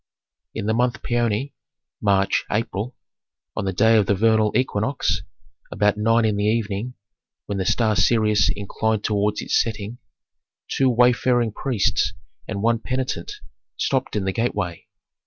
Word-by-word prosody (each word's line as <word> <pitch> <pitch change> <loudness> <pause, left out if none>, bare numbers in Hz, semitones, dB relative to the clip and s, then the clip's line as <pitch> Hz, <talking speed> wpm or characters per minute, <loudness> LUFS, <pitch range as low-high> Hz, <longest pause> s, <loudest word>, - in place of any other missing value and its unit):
In - - -3
the 110 - +1
month 125 +2 0
Paoni 120 +2 0 0.5
(March 100 -1 +2
April), 110 +2 -2 0.6
on - - -2
the 95 - 0
day 110 +4 +4
of 105 -4 +2
the 100 - +3
vernal 110 +1 +3
equinox, 110 - 0 0.5
about 105 0 +2
nine 115 +2 +2
in 105 -2 +1
the 100 - 0
evening, 110 +2 -1 0.5
when 100 -1 -3
the 95 - -1
star 110 -3 +2
Sirius 105 +1 +3
inclined 105 +1 -1
toward 105 0 +1
its - - +2
setting, 110 +1 -5 0.7
two 135 -1 +2
wayfaring 120 -1 +3
priests 100 -6 0 0.3
and 100 -1 -4
one 115 0 +2
penitent 130 +2 -3 0.4
stopped - - -1
in 100 -2 -1
the 95 - -1
gateway. 105 -7 -2
110 Hz, 140 wpm, -22 LUFS, 100-120 Hz, 0.7 s, day